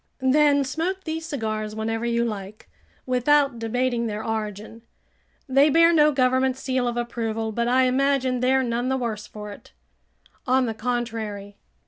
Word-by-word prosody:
"Then 290 -1 +4
smoke 345 +8 -3
these 320 0 -4
cigars 215 -7 -3
whenever 225 +1 -2
you 235 0 +1
like, 205 - -6 0.4
without 260 0 +2
debating 235 +1 -1
their 215 0 -4
origin. 220 0 -4 0.7
They 275 +3 +4
bear 335 +3 +5
no 300 -2 +5
government 260 -1 +2
seal 260 -2 -1
of 240 0 -2
approval, 225 -2 -3
but 235 +2 -1
I 255 +2 +3
imagine 260 0 +1
they're 260 +1 +2
none 240 +1 -1
the 265 - +1
worse 220 -4 -4
for 210 -1 -9
it." 200 - -14 0.7
"On 255 0 +3
the 225 - -2
contrary." 220 -4 -4
245 Hz, 150 wpm, -24 LUFS, 225-265 Hz, 0.7 s, bear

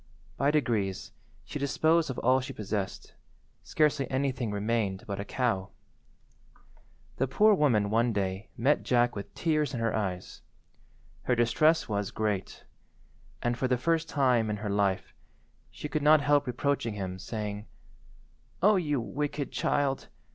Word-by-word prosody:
By 140 - +2
degrees 115 -10 0 0.3
she 150 - -6
disposed 155 +3 +2
of 130 - -4
all 130 +2 +3
she 135 +2 -6
possessed—scarcely 120 +7 -3
anything 130 -3 -1
remained 105 -2 -1
but 100 -1 -4
a - - -2
cow. 105 -4 -1 1.5
The 135 - +1
poor 210 +10 +4
woman 115 - +2
one 115 +2 +2
day 95 -1 -2
met 135 +6 +2
Jack 120 -1 +2
with 100 -1 -6
tears 155 -4 0
in - - -3
her 115 -1 0
eyes. 95 -4 -4 0.8
Her 125 - +2
distress 135 +8 +3
was 100 -2 -2
great, 105 -3 -3 0.8
and, 120 0 +1
for 130 +2 -1
the 125 0 +1
first 165 +4 0
time 125 -6 +2
in 105 - -2
her 105 -1 -4
life, 100 -2 0 0.6
she - - -7
could 150 +1 -2
not 150 +1 +6
help 145 0 +2
reproaching 125 -2 -1
him, 95 -2 -5
saying— 105 0 -5 1.0
"O 210 +1 +6
you 150 -6 0
wicked 145 +4 -3
child! 140 -2 0
120 Hz, 140 wpm, -29 LUFS, 105-145 Hz, 1.5 s, not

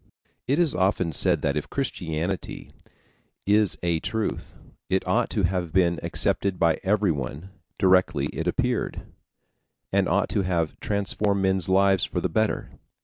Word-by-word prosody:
It 140 +3 +2
is 170 -4 +3
often 95 -2 +1
said - - +1
that 70 - +1
if 75 - -3
Christianity 85 - -3 0.7
is 105 0 +3
a 85 -2 +1
truth, 110 +5 -3 0.3
it 95 0 0
ought 115 +6 +1
to 105 - -1
have 90 -2 -1
been 85 -1 +2
accepted 95 -2 0
by 85 -2 +2
everyone 95 - -1 0.3
directly 90 -6 +3
it 80 +2 -3
appeared, 125 +6 -1 0.9
and - - +2
ought - - +1
to - - 0
have 85 -4 -1
transformed 100 -1 +1
men's 95 -2 +1
lives 95 0 +3
for - - -2
the - - -1
better. 110 -1 -1
95 Hz, 145 wpm, -25 LUFS, 85-100 Hz, 0.9 s, is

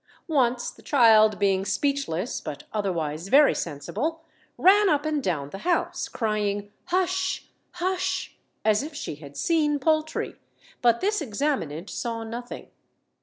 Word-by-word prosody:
Once 245 -3 +2
the - - -18
child, 220 -6 +5
being 195 -2 +2
speechless, 205 - -1
but 145 - -6
otherwise 170 -5 -2
very 285 +7 +6
sensible, 210 - -3 0.3
ran 400 +2 +6
up 295 -2 +1
and 305 -2 0
down 145 -6 -2
the 195 - -7
house, 350 - 0
crying, 205 -2 -2
'Hush! 370 +1 0 0.3
hush!' 365 +1 -2 0.3
as 215 0 +4
if 295 +1 -7
she 290 - -4
had 145 -2 -12
seen 305 -3 +2
poultry; 310 +2 0 0.4
but 235 -1 +3
this 415 0 +1
examinant 210 - -2
saw 230 0 -4
nothing. 235 +2 -7
240 Hz, 130 wpm, -26 LUFS, 200-310 Hz, 0.4 s, very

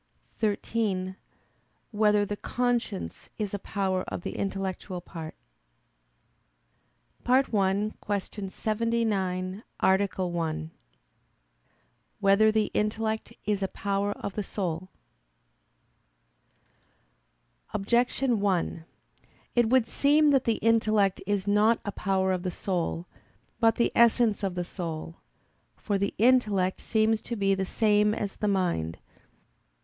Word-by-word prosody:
(13) 205 -3 -1 0.8
Whether 210 -1 +3
the 205 - -3
conscience 240 -3 -2
is 210 -2 -3
a 205 - -2
power 190 -2 -1
of - - -4
the - - -5
intellectual 190 -1 -3
part? 165 -2 -8 1.9
_______________________ - - -35
FIRST 260 +2 +3
ARTICLE 210 - +3 0.5
[I, 205 -1 +2
Q. 200 -3 -6
79, 210 -3 -1 0.2
Art. 190 +1 +2
1] 165 -3 -2 1.5
Whether 205 +2 +5
the 215 -1 +1
Intellect 220 +1 -1
Is 205 -1 0
a 195 - +1
Power 200 +1 -1
of 200 - -6
the 210 - -2
Soul? 185 -3 -3 2.8
Objection 240 +3 +1
1: 180 -4 0 0.7
It 240 -2 +3
would 255 -2 +4
seem 295 +1 +4
that 270 -2 +3
the 230 -2 +2
intellect 215 -4 +3
is 205 -1 0
not 210 +3 +4
a 205 - -2
power 190 -1 0
of 185 -1 -1
the 185 - -2
soul, 175 -2 -2 0.5
but 225 -1 +4
the 235 - +2
essence 235 -2 +4
of 195 -3 -2
the 175 -1 -2
soul. 165 -2 -6 0.6
For 200 -2 -2
the 200 - -1
intellect 210 -6 +3
seems 220 0 +1
to 235 - -5
be 195 -2 +2
the 190 -1 -1
same 210 0 +3
as 200 -2 -4
the 210 - -1
mind. 175 - 0
205 Hz, 120 wpm, -28 LUFS, 190-220 Hz, 2.8 s, Whether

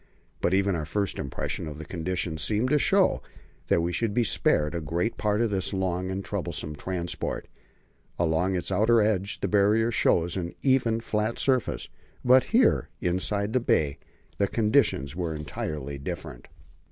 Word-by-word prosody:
But 90 - +2
even 100 0 +2
our 80 -3 -3
first 100 +3 -1
impression 70 +3 -4
of 75 -1 -7
the 80 - -8
conditions 85 -1 -3
seemed 110 - +1
to 150 - +4
show - - +3 0.5
that 85 - +3
we 85 +1 -1
should 110 0 -1
be 120 - +3
spared 85 -5 +2
a 85 - -2
great 85 +8 -1
part 105 0 0
of 115 -2 +1
this 95 0 0
long 95 -1 -1
and 95 +1 -4
troublesome 85 -6 -4
transport. 85 +2 -4 0.7
Along 85 +3 +1
its 90 - -2
outer 110 +5 +4
edge 105 -2 0
the - - 0
Barrier 105 +3 +3
shows 85 -6 +2
an 85 -2 -4
even, 125 -4 +2
flat 110 0 -1
surface; 130 -3 0 0.4
but 130 +1 +6
here, 240 +3 +3
inside 100 +4 -1
the 130 - +3
bay, 75 - +1 0.4
the 100 - +3
conditions 105 - +1
were 85 -3 -2
entirely 75 -2 -5
different. 80 -3 -7
95 Hz, 165 wpm, -27 LUFS, 85-110 Hz, 0.7 s, but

